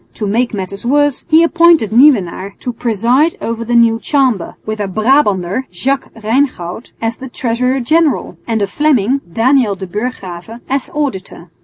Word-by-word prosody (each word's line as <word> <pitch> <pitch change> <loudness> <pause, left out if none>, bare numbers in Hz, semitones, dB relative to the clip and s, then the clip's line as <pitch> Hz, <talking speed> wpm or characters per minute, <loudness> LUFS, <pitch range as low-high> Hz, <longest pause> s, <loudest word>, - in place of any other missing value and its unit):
To 210 - -3
make 230 +5 0
matters 195 -1 -5
worse, 290 +2 +1
he 320 +1 +5
appointed 335 - +4
Nieuwenaar 210 - +3
to 245 - -4
preside 240 - +1
over 230 0 -4
the 240 +1 -1
new 230 -1 +4
Chamber, 260 - 0
with 215 0 -4
a 205 - -2
Brabanter, 215 -1 +1
Jacques 265 +10 -2
Reingoud, 225 -4 -2
as 225 0 -3
treasurer 250 +2 -1
general, 310 +4 +1
and 225 -3 0
a - - +3
Fleming, 265 +2 +1
Daniel 235 -1 +2
de 190 0 -7
Burchgrave, 205 0 -6
as 270 -1 -2
auditor. 190 - -4
235 Hz, 150 wpm, -15 LUFS, 205-270 Hz, -, he